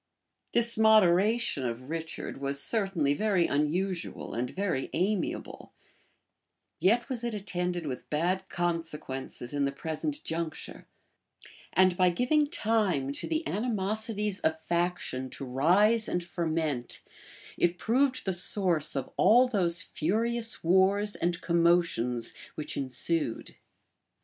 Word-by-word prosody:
This 235 -1 +2
moderation 215 - +4
of 125 +3 -4
Richard 165 0 -5
was 140 0 0
certainly 195 -8 +2
very 190 0 +2
unusual 170 +6 -1
and 125 +2 -2
very 185 -5 -2
amiable; 190 +1 -2 1.1
yet 230 +8 +3
was 250 -3 -4
it 235 -2 -2
attended 180 -4 -3
with 130 -4 -6
bad 180 +5 -1
consequences 160 -7 -2
in 145 -1 +1
the 140 - 0
present 160 - -4
juncture; 160 -1 -5 0.9
and 185 -1 +4
by 185 -1 +5
giving 255 - +2
time 210 - +1
to 140 - -5
the 320 +1 -1
animosities 210 -1 -1
of 160 0 0
faction 170 -7 -1
to 135 - -7
rise 190 - +3
and 175 - -1
ferment, 160 -7 -2 0.5
it 175 0 +1
proved 255 +6 +1
the 190 - 0
source 175 -4 0
of 135 -2 -3
all 245 +4 +6
those 185 -6 0
furious 225 +9 -1
wars 190 +4 +3
and 175 0 -1
commotions 170 -9 +1 0.2
which 155 - -5
ensued. 135 +1 -2
175 Hz, 120 wpm, -29 LUFS, 155-210 Hz, 1.1 s, all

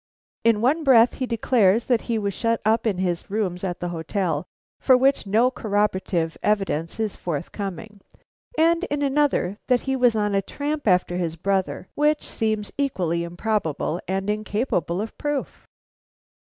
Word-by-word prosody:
In 230 -2 +3
one 290 +7 +2
breath 245 -4 +6
he 255 - -1
declares 225 -2 +2
that 240 -3 +2
he 230 - +1
was 200 -2 -1
shut 230 +4 0
up 225 +2 +2
in 200 -4 0
his 180 -2 -2
rooms 195 -4 -2
at 180 -2 -3
the 175 - -2
hotel, 175 +2 -2 0.3
for 260 -2 +5
which 270 -4 +2
no 230 +6 +3
corroborative 200 -7 -1
evidence 195 -5 -1
is 220 -2 -1
forthcoming; 190 +5 -5 0.6
and 335 +2 +3
in 290 0 -2
another 275 -8 +1
that 250 -2 +3
he 265 0 -1
was 245 -3 +3
on 210 -1 0
a 195 - +2
tramp 290 +6 -4
after 180 -1 +2
his 170 -3 -2
brother, 190 +1 -1
which 300 0 +1
seems 215 -2 -2
equally 175 - 0
improbable 170 -2 -2
and 195 +1 -2
incapable 210 -3 -1
of 220 - -6
proof. 290 -2 -3
210 Hz, 155 wpm, -23 LUFS, 185-250 Hz, 0.6 s, breath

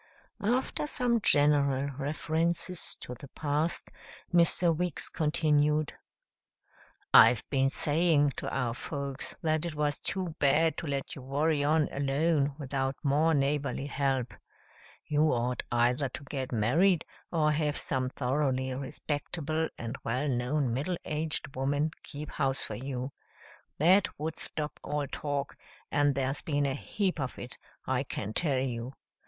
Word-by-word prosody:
After 255 +6 0
some 245 -5 +1
general 145 -3 +3
references 160 +5 -1
to 125 - -6
the 130 +3 -10
past, 150 +4 -1 0.4
Mr. 170 0 +4
Weeks 175 -1 -2
continued, 150 -1 +2 1.2
"I've 120 - +7
been 135 -1 +3
saying 150 0 +3
to - - -3
our 125 -3 -1
folks 140 +1 -5
that 155 -1 +1
it 170 -3 -4
was 150 -1 0
too 185 -4 -3
bad 155 +3 +4
to 170 - -4
let 140 -1 -3
you 135 - -8
worry 145 +3 +1
on 150 +1 +3
alone 140 +1 +1
without 135 -2 -2
more 150 +3 +3
neighborly 140 0 0
help. 135 -3 -1 0.7
You 150 0 +2
ought 125 +1 0
either 125 +3 +2
to 140 - -8
get 135 -2 -4
married 155 - +3 0.3
or 155 -3 +3
have 150 -1 0
some 130 -1 -1
thoroughly 130 0 0
respectable 150 +4 -3
and 115 +2 -5
well 125 +6 -1
known 125 0 0
middle 150 +8 -1
aged 150 -2 -2
woman 145 +4 0
keep 150 +1 -8
house 135 -1 0
for - - -5
you. 130 +3 -4 0.7
That 185 +6 +5
would 160 +2 -4
stop 150 -1 -2
all 145 0 -1
talk, 140 0 -3 0.4
and 145 -1 +3
there's 135 0 -1
been 145 -2 0
a 135 - 0
heap 185 +5 -2
of 130 -2 -3
it, 120 0 -8 0.3
I 130 -1 +1
can 110 -6 -5
tell 145 -3 +1
you. 125 -1 -2
145 Hz, 140 wpm, -30 LUFS, 135-155 Hz, 1.2 s, I've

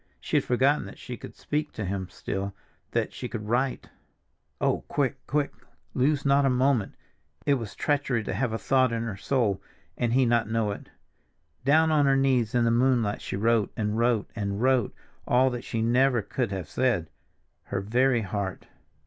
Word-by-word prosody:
She - - 0
had - - +2
forgotten 135 +4 +2
that - - -11
she 125 - -7
could - - -11
speak 150 +1 -3
to 105 - -4
him 95 -1 -3
still, 100 0 -4 0.3
that - - -1
she 125 - -5
could 105 -3 -5
write. 125 +4 0 0.7
Oh, - - +1
quick, 135 -2 0
quick, 145 0 0 0.4
lose 140 +3 +1
not 140 0 +4
a 135 - +3
moment; 125 -4 +1 0.5
it 145 - +4
was 115 -7 -3
treachery 140 -6 0
to 100 - -3
have 120 +4 0
a 110 - -1
thought 130 0 +2
in 115 0 -1
her 110 -4 -4
soul 105 -2 0 0.3
and 120 -1 0
he 130 0 +4
not 115 -2 +2
know 110 -2 0
it! 100 - -8 0.8
Down 160 +3 +4
on 145 -2 +4
her 135 0 +4
knees 130 -4 +2
in 120 -1 +3
the 115 - +3
moonlight 120 -3 +2
she - - -4
wrote, 110 +1 +2
and 105 -1 -1
wrote, 115 -2 +2
and 100 -2 -2
wrote, 130 -2 +2 0.4
all 130 +1 +4
that 120 0 -5
she 115 -2 -2
never 120 0 +3
could 120 +2 -2
have 95 -5 -4
said—her 95 -6 -3
very 120 +4 +2
heart. 100 -1 -4
120 Hz, 185 wpm, -27 LUFS, 105-135 Hz, 0.8 s, not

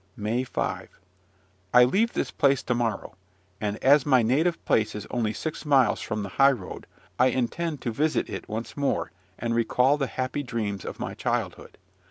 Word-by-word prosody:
MAY 110 +4 -1
5. 130 - -4 0.8
I 125 - +9
leave 210 - +2
this - - -2
place 140 -2 +2
to 125 - 0
morrow; 115 -5 -2 0.5
and, 105 0 -2
as 140 +1 +6
my 130 -4 +4
native 155 +9 +1
place 110 -1 +1
is 105 0 -6
only 115 -3 0
six 155 +8 -5
miles 140 -5 +3
from 105 -2 -3
the 100 - -5
high 140 0 +7
road, 100 -8 -8 0.3
I 125 - +6
intend 135 +5 -2
to 120 - -2
visit 150 +7 0
it - - -7
once 110 +2 -5
more, 140 -1 -1 0.3
and 115 0 -2
recall 125 +4 +3
the 135 -2 -1
happy 130 +3 -3
dreams 110 -7 -4
of - - -7
my - - -4
childhood. - - -3
125 Hz, 180 wpm, -26 LUFS, 110-140 Hz, 0.8 s, I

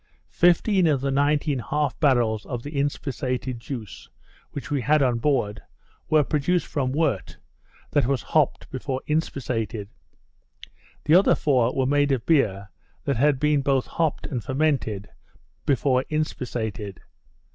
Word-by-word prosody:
Fifteen 175 +2 +4
of 145 -4 +2
the 135 0 -1
nineteen 145 0 +1
half 145 +1 -2
barrels 120 -7 +2
of 120 -2 -4
the 145 +1 -7
inspissated 130 -3 -2
juice 110 - -8 0.4
which 145 +2 -7
we 140 -2 +1
had 150 +3 +3
on 120 -3 +1
board, 115 -6 0 0.5
were 155 -1 +5
produced 155 +5 0
from 130 -3 -2
wort 140 - -1 0.5
that 145 -5 +2
was 135 -2 0
hopped 155 -4 +1
before 130 0 -3
inspissated. 115 -9 -2 1.2
The 155 - +3
other 185 +3 +6
four 125 -4 +1
were 130 - +1
made 145 +1 +2
of 125 -3 0
beer 100 - +1 0.3
that 140 -4 0
had 140 +1 +3
been 150 -1 +2
both 135 -1 +1
hopped 160 -3 -1
and 125 -6 -4
fermented 130 -8 -1 0.6
before 130 -2 +2
inspissated. 115 -9 -3
135 Hz, 135 wpm, -24 LUFS, 120-150 Hz, 1.2 s, other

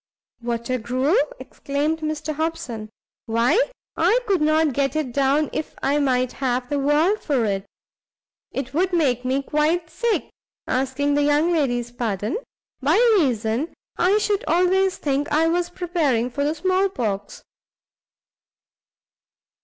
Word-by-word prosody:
"Water 235 +1 -2
gruel!" 255 - +1 0.2
exclaimed 295 - -2
Mr 310 0 -3
Hobson, 280 -9 -3 0.4
"why 235 - +3 0.3
I 370 +9 +3
could 390 -6 +1
not 310 -1 +3
get 275 +3 0
it 305 -5 -1
down 280 +3 +1
if 310 - -4
I 285 +2 +2
might 255 -3 +1
have 250 -1 0
the 290 - 0
world 305 +9 +2
for 260 -6 +1
it! 195 -1 -2 0.8
it 270 0 -4
would 360 +4 +1
make 265 -8 +2
me 265 +2 0
quite 315 +3 0
sick, 450 +7 -1 0.3
asking 270 +2 0
the 290 - +2
young 295 +4 +3
lady's 245 -6 0
pardon, 225 - -2 0.4
by 290 +5 +3 0.2
reason 240 0 0 0.2
I 375 +4 +3
should 415 +1 0
always 370 +2 +2
think 285 0 -1
I 315 +2 +3
was 350 +1 0
preparing 325 -10 0
for 285 +4 -2
the 300 +2 0
small 375 +4 +1
pox. 205 - -4
290 Hz, 135 wpm, -23 LUFS, 250-330 Hz, 0.8 s, why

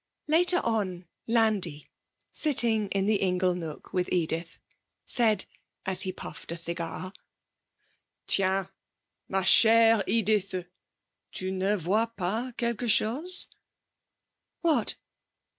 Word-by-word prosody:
Later 350 +3 +4
on 195 -6 -2 0.2
Landi, 215 -10 0 0.5
sitting 230 -8 +1
in 195 0 -1
the 210 0 +2
ingle 180 -1 +1
nook 165 -4 -8
with 180 -1 -1
Edith, 165 -1 -2 0.5
said, 220 -5 +2 0.4
as 190 -1 +4
he 185 - -1
puffed 185 - -10
a 170 - -4
cigar: 170 +2 0 1.1
'Tiens, 190 -1 +1 0.6
ma 190 0 0
chère 225 +2 +6
Edith, 200 -5 0 0.7
tu 185 0 -3
ne 190 +2 0
vois 205 +6 0
pas 215 +7 -2
quelque 235 0 -2
chose?' 280 - +2 1.2
'What?' 330 -3 +2
195 Hz, 105 wpm, -27 LUFS, 180-225 Hz, 1.2 s, chère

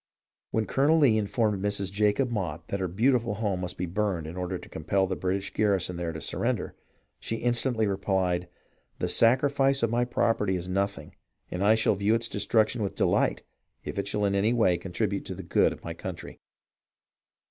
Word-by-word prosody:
" - - -67
When 110 -1 0
Colonel 145 +7 +3
Lee 140 -8 +5
informed 105 -1 0
Mrs. 100 -2 0
Jacob 105 +5 +1
Motte 85 -7 -4
that 100 - -2
her 95 - -1
beautiful 115 +4 +1
home 100 -4 -1
must 90 -1 -5
be 90 - -2
burned 95 -2 -1
in 80 +2 -7
order 90 -1 -3
to - - -12
compel 95 +5 0
the 95 0 -2
British 95 +2 -2
garrison 95 -4 +1
there 85 -1 -3
to 80 - -6
surrender, - - -1 0.5
she 115 - -3
instantly 120 -1 +1
replied, 95 -3 0 0.5
"The - - -1
sacrifice 135 +2 +3
of 115 - +2
my 120 +1 +2
property 115 -5 +1
is 90 0 -4
nothing, 100 +2 -2 0.4
and 90 +2 -2
I 105 +2 +5
shall 110 -1 +3
view 100 +3 +2
its 115 0 -1
destruction 110 +1 +1
with 100 - -2
delight - - +1 0.4
if - - -4
it 100 - -2
shall 105 0 0
in 100 - +1
any 100 +4 +2
way 110 -7 +3
contribute 100 +2 -2
to - - -5
the - - -8
good - - +2
of - - -10
my 85 - -5
country." 85 0 -8
100 Hz, 190 wpm, -27 LUFS, 90-115 Hz, 0.5 s, Lee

